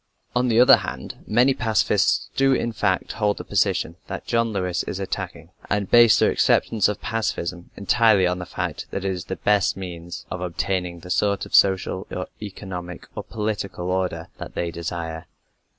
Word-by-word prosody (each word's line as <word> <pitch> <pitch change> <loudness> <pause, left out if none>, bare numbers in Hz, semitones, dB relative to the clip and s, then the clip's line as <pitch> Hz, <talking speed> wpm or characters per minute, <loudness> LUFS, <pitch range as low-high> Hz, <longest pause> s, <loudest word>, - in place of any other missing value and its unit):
On 125 +1 +2
the 115 -1 +3
other 125 +2 +8
hand, 65 +1 -7
many 125 +5 +4
pacifists 110 -5 +1
do 135 0 +4
in 120 - 0
fact 105 -4 0
hold 105 -2 0
the - - -6
position 85 +2 0
that - - -6
John 115 -1 +1
Lewis 90 -3 -1
is 95 - -5
attacking, 95 -3 -5 0.2
and 100 -2 -1
base 120 -1 +7
their - - +4
acceptance 110 -4 +3
of 105 - -3
pacifism 95 -5 -3
entirely 105 -1 +4
on 90 0 0
the 90 - -6
fact - - -4
that 95 - -4
it 95 - +1
is 90 -3 -5
the - - -4
best 105 -2 +2
means 85 -2 -7
of 90 - -4
obtaining 90 0 -2
the 90 - -8
sort 100 +1 +1
of - - -14
social 95 -1 +3
or 90 - -4 0.2
economic 95 -4 -7
or - - -3
political 100 -4 -3
order 90 -3 -2
that - - -8
they 85 -1 -2
desire. 80 -1 -5
95 Hz, 180 wpm, -23 LUFS, 90-110 Hz, 0.2 s, other